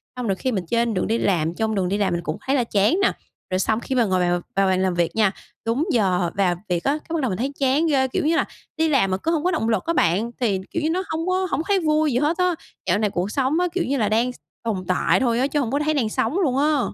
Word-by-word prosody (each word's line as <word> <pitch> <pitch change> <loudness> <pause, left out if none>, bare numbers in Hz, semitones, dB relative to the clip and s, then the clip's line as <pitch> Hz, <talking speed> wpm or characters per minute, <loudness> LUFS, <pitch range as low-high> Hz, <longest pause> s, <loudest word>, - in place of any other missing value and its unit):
xong 250 -2 -4
rồi 195 - +1
khi 260 +7 -2
mình 190 -6 -2
trên 235 +2 +1
đường 185 - -1
đi 225 - +1
làm, 170 -6 +1
trong 220 +1 -1
đường 185 -2 0
đi 200 - 0
làm 195 -3 +1
mình 170 - -1
cũng 155 - -3
thấy 270 - +1
là 255 - +2
chán 215 - +2
nè. - - +4 0.4
Rồi 185 - +1
xong 220 +3 +1
khi 260 - -4
mà 245 -2 +3
ngồi 185 -2 +1
vào 175 0 +1
vào 195 0 +3
bàn 185 0 +2
làm 185 -1 +1
việc 170 +2 0
nha, 210 -3 +3 0.3
đúng 240 +8 0
giờ 185 - +1
vào 190 -3 +2
việc 175 -1 0
á, 275 - +2
cái 315 +2 -9
bắt 310 - 0
đầu 255 - 0
mình 185 - -2
thấy 265 +4 -2
chán 280 +5 +2
ghê, 270 -3 +2
kiểu 350 +3 -1
như 325 +2 +3
là, - - +2 0.3
đi 320 0 +2
làm 245 -10 +2
mà 185 - +1
cứ 325 +12 -1
hông 315 -1 0
có 365 - +2
động 305 -10 0
lực 220 -5 0
á 335 - 0
bạn, 195 - +1
thì 205 -7 +1
kiểu 335 - -2
như 310 - +1
nó 365 +3 0
hông 325 +2 -2
có 370 0 +1
hổng - - 0
thấy 400 -1 +3
vui 310 -2 +2
gì - - +2
hết 300 +5 +1
á. 360 -1 +2 0.3
Dạo 180 - +3
này 210 -2 +1
cuộc 190 +3 -2
sống 275 +5 +1
á 360 - +2
kiểu 365 - 0
như 275 +2 0
là 215 -4 +1
đang 235 +3 +1
s - - -17 0.3
tồn 205 -5 -2
tại 185 - +2
thôi 240 -3 +1
á, 265 - +2
chứ 295 +1 -1
hông 245 -3 -1
có 285 - +1
thấy 310 +1 +1
đang 240 -7 0
sống 255 - 0
luôn 275 -9 +1
á. 295 +1 +2
235 Hz, 310 wpm, -22 LUFS, 195-300 Hz, 0.4 s, nè